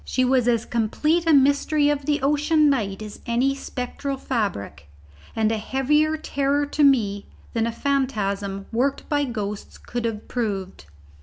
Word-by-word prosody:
She 255 - 0
was 250 -1 +2
as 235 -1 +2
complete 305 +9 0
a - - +5
mystery 285 +1 +4
of 290 -1 -2
the 295 -3 +1
ocean 300 +1 +3
night 210 -6 -2
as 210 -1 -9
any 245 +4 +2
spectral 275 +1 -5
fabric, 185 - -3 0.5
and 220 -1 +2
a 220 - -1
heavier 300 +7 +1
terror 285 -1 0
to 290 +1 0
me 210 -8 +3 0.3
than 230 0 +1
a - - -1
phantasm 205 -8 -1
worked 270 +4 0
by 290 -2 +1
ghosts 210 -5 -5
could 240 -1 -5
have 220 -2 -4
proved. 195 - -3
255 Hz, 155 wpm, -23 LUFS, 215-285 Hz, 0.5 s, a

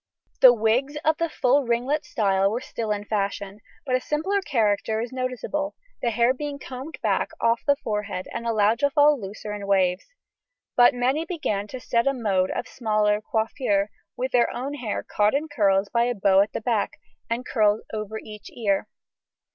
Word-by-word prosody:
The 255 - +10
wigs 240 +6 +1
of 315 0 +3
the 335 0 -1
full 265 -1 +2
ringlet 260 +6 0
style 195 - +2
were 225 +4 -2
still 230 -3 -5
the 205 -1 -2
fashion, 200 -1 -2 0.3
but 260 - -2
a 255 - 0
simpler 380 +9 0
character 220 - 0
is 235 +1 -4
noticeable, 260 +4 -3 0.3
the 240 - +1
hair 235 +2 +3
being 290 +1 -5
combed 265 +3 -8
back - - +1
off 230 0 +2
the 285 - +5
forehead 210 -6 -4
and 235 - -4
allowed 220 0 +2
to 285 - +3
fall 295 +1 +5
in 280 - -6
looser 205 +1 -6
waves. 190 -2 +1 0.7
But 245 0 +6
many 260 +6 +1
began 300 - -2
to 255 - -7
set 235 0 0
a 275 - +3
mode 195 -6 +1
of - - -3
smaller 215 -3 +1
"coiffure," 220 -4 0 0.3
with 255 +2 -2
their 240 -1 +3
own 270 +4 -4
hair 245 -7 -3
caught 210 +4 +1
in 300 +3 -1
curls 200 -8 +2
by 235 0 +3
a 245 0 -1
bow 195 -1 +4
at 205 - -1
the - - -3
back, 220 -2 0 0.4
and 235 +2 -2
curls 215 -2 +2
over 215 0 -4
each 210 -1 -10
ear. 205 -3 0
235 Hz, 185 wpm, -24 LUFS, 210-265 Hz, 0.7 s, The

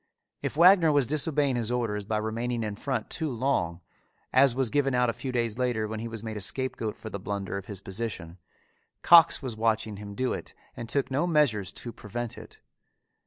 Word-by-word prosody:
If - - -3
Wagner 175 -1 +7
was 145 -3 +3
disobeying 145 -1 +1
his 120 -1 -1
orders 110 -4 -1
by 110 +1 -1
remaining 115 +2 -2
in 105 -1 -3
front 125 0 -3
too 160 -2 -1
long, 115 -10 -1 0.5
as 130 -1 +5
was 130 -3 0
given 135 -3 +1
out 125 -1 +3
a - - -11
few 130 +3 -5
days 120 -2 -1
later 120 -4 0
when 110 0 -5
he 115 - -4
was 115 -1 -7
made 110 -1 -5
a - - -5
scapegoat 110 0 -1
for 110 - -8
the 100 - -5
blunder 100 -1 -4
of 100 -1 -6
his 100 -3 -7
position, 95 -5 -5 0.6
Cox 165 -3 +7
was 125 -4 -4
watching 110 -1 0
him 100 0 -8
do 130 +2 0
it - - -7 0.2
and 115 -1 -7
took 140 -1 0
no 145 +7 +1
measures 140 - +2
to 120 - -7
prevent 120 +2 -5
it. - - -13
115 Hz, 205 wpm, -27 LUFS, 105-135 Hz, 0.6 s, Wagner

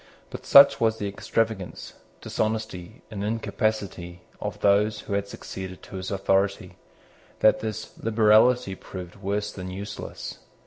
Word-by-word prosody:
But - - -8
such 140 0 +8
was 110 -1 +2
the 105 - -3
extravagance, 100 -1 -2 0.3
dishonesty, 110 -2 -3
and 100 -2 -4
incapacity 100 -5 -2 0.2
of - - -4
those 105 +1 +3
who - - -6
had 100 0 0
succeeded 95 -2 -8
to 95 - -8
his 95 0 -5
authority, 95 0 0 0.7
that 110 - +5
this 110 0 -5
liberality 110 0 +4
proved 90 -1 -9
worse 100 +1 -2
than 95 -1 -7
useless. 100 +3 -7
100 Hz, 130 wpm, -25 LUFS, 95-110 Hz, 0.7 s, such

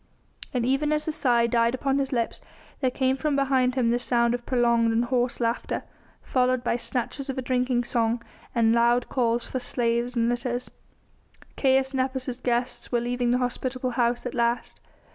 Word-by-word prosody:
And 250 -4 -1
even 275 +4 +1
as 305 0 +1
the 315 - -1
sigh 245 -6 +2
died 235 +1 +2
upon 275 +1 0
his 270 -1 -1
lips 235 -3 -1 0.4
there 260 - +2
came 260 +1 +1
from 295 +1 -1
behind 265 -2 +2
him 240 -3 +2
the 240 - +1
sound 235 -1 +2
of 240 0 -4
prolonged 235 -2 +3
and 230 +2 +1
hoarse 245 0 0
laughter, 230 -1 -1 0.4
followed 255 -1 +1
by 240 - +1
snatches 250 +3 -4
of 270 - -3
a - - -1
drinking 250 -1 +1
song 235 0 0 0.4
and 230 -1 +4
loud 235 +1 +3
calls 235 -2 0
for 260 - -3
slaves 240 0 -1
and 230 -1 +2
litters. 245 +1 -2 0.8
Caius 265 0 +2
Nepos' 260 -1 -1
guests 245 0 -2
were 240 - +2
leaving 245 0 -1
the 245 - +3
hospitable 255 0 -2
house 240 0 0
at 250 - -3
last. 235 0 -1
245 Hz, 180 wpm, -26 LUFS, 235-260 Hz, 0.8 s, and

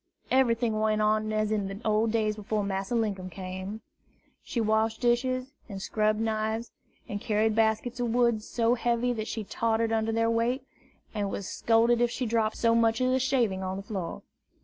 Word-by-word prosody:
Everything 235 -4 +2
went 215 0 +1
on 215 0 +2
as 215 0 0
in 205 -3 0
the 195 +1 -6
old 215 +1 +2
days 215 -2 +1
before 210 0 -2
Master 195 +3 -2
Linkum 200 -5 -1
came. 190 +3 -6 0.6
She 240 - -4
washed 220 0 +1
dishes, 255 +2 +1 0.2
and 195 -2 -6
scrubbed 215 +2 0
knives, 220 +1 -1 0.4
and 205 0 -4
carried 215 0 +1
baskets 225 +3 +1
of 240 -1 0
wood, 235 -2 +2
so 230 +1 +1
heavy 240 0 +1
that 220 -2 -4
she 220 - -3
tottered 225 +2 0
under 225 0 +1
their 230 0 +1
weight, 240 +3 0 0.5
and 205 -2 -1
was 195 -1 -4
scolded 230 +1 +3
if 240 - +3
she 250 +2 -3
dropped 225 -1 0
so 230 -1 +3
much 230 -1 +3
as 255 0 +2
a 260 - +2
shaving 240 -7 +1
on 190 0 -3
the 195 - -6
floor. 190 -5 -5
220 Hz, 185 wpm, -28 LUFS, 215-235 Hz, 0.6 s, scolded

